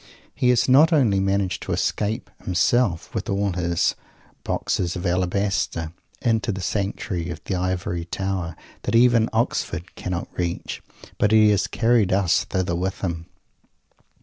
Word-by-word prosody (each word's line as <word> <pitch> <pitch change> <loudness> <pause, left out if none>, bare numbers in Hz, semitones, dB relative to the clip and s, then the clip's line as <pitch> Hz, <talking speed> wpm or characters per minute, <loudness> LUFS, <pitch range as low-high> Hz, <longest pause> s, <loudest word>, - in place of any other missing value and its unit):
He 125 - +1
has 125 -2 +3
not 145 +6 +6
only 120 -11 +3
managed 95 -1 0
to - - -3
escape, 110 +3 -1
himself, 90 +1 +1
with - - -3
all 100 0 0
his 85 -1 +1 0.5
"Boxes 85 -1 -1
of 90 - -5
Alabaster," 90 -2 0 0.3
into 115 -2 +1
the 95 - -4
sanctuary 95 -2 -2
of 85 -2 -5
the - - -3
Ivory 90 -2 -2
Tower, 95 -2 -3 0.3
that - - -1
even 115 -1 +5
Oxford 85 +2 -1
cannot 90 -1 -4
reach, 85 -1 -3 0.4
but 105 - +3
he 110 -1 +6
has 100 -1 +1
carried 115 -4 +2
us 95 -2 +2
thither 95 -2 -1
with 95 +2 -3
him. 85 -3 -3
95 Hz, 145 wpm, -23 LUFS, 85-110 Hz, 0.5 s, not